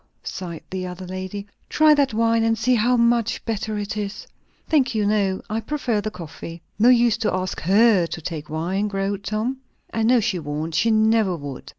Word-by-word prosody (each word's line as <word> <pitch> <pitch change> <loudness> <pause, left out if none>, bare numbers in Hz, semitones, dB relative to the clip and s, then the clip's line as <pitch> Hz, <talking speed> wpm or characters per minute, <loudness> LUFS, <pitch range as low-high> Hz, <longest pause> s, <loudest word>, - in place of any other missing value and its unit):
sighed 170 -4 -6
the 185 -1 -3
other 180 +1 -7
lady. 185 +2 -6 0.2
"Try 310 0 +5
that 285 -3 +2
wine, 230 +1 +2
and 225 0 +2
see 250 +3 +2
how 245 +2 +3
much 235 -1 +1
better 215 -1 -2
it 205 0 -4
is." 205 -1 -5 0.4
"Thank 275 -7 +2
you, 210 -1 +1
no; 200 -2 +1
I 215 +1 -2
prefer 245 -4 -1
the 215 - -3
coffee." 170 -2 -9 0.2
"No 235 +3 +6
use 240 -3 +4
to 230 -2 0
ask 185 0 -2
her 195 0 +4
to 165 - -6
take 155 -2 -6
wine," 180 +6 -1
growled 195 0 -2
Tom. 220 +6 -2 0.4
"I 225 - -1
know 240 +2 +4
she 210 -5 -1
won't. 155 +1 -4
She 230 - +2
never 220 -3 +3
would. 140 -4 -8
210 Hz, 195 wpm, -22 LUFS, 185-230 Hz, 0.4 s, No